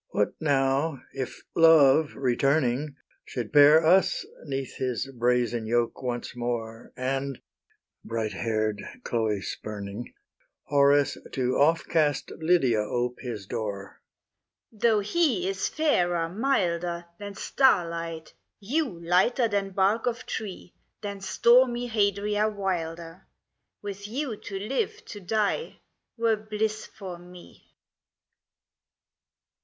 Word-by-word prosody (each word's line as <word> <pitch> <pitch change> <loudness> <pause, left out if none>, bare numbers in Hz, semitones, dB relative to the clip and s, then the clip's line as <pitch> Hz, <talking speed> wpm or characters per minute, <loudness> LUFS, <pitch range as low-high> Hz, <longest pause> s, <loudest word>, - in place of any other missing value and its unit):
H. - - -31
What 105 - +1
now, 140 0 +1
if 130 -2 -5
Love 160 -2 +6
returning 135 +1 +1 0.3
Should 120 -2 -6
pair 150 +2 +7
us 185 +3 +3 0.2
'neath 135 -3 -4
his 125 -2 -1
brazen 120 -1 +1
yoke 120 0 0
once 120 -2 -4
more, 115 -2 -4
And, 135 +1 -2 0.6
bright 110 -2 -3
hair'd 110 0 -1 0.2
Chloe 110 -4 -1
spurning, 105 +2 -6 0.5
Horace 140 0 +3
to 130 -1 0
off 160 +4 +3
cast 150 -4 +1
Lydia 160 -9 +2
ope 120 +3 -2
his 115 -6 -6
door? 100 -3 -5 0.7
L. 215 - -20
Though 225 -2 +4
he 225 - +1
is 195 0 -1
fairer, 175 - +1
milder, 175 -6 0
Than 205 -1 -7
starlight, 170 - +1 0.3
you 225 - -2
lighter 195 +8 +3
than 200 -2 -1
bark 195 +5 +1
of 245 +1 -2
tree, 195 -4 -6 0.3
Than 200 -2 -5
stormy 240 +4 +4
Hadria 210 -1 +1
wilder, 170 -4 -4 0.6
With 200 0 -6
you 255 +1 -3
to 200 -1 -7
live, 275 - -3
to 205 - -8
die, 215 - -1 0.4
were 230 -1 +2
bliss 215 0 -3
for 185 -5 -9
me. 180 0 -15
165 Hz, 115 wpm, -27 LUFS, 125-205 Hz, 0.7 s, pair